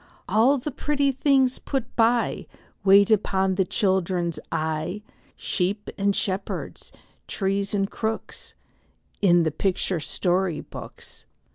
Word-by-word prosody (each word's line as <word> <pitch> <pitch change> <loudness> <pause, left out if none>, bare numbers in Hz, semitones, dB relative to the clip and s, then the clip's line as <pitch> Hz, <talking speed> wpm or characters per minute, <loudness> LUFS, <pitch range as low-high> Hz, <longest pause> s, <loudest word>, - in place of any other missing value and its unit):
All 230 +8 +4
the 285 +4 -4
pretty 285 0 0
things 265 -1 +2
put 265 -4 -4
by, 235 +1 +1 0.4
Wait 200 +2 +6
upon 190 -2 +2
the 190 +1 +2
children's 180 -3 0
eye, 160 +6 -2 0.3
Sheep 200 +3 -2
and 200 0 +1
shepherds, 195 0 -4 0.4
trees 195 +1 -1
and 195 -1 +1
crooks, 220 +2 -5 0.7
In 175 -4 +5
the 160 - 0
picture 185 +2 -1
story 175 0 0
books. - - -10
195 Hz, 115 wpm, -24 LUFS, 185-225 Hz, 0.7 s, Wait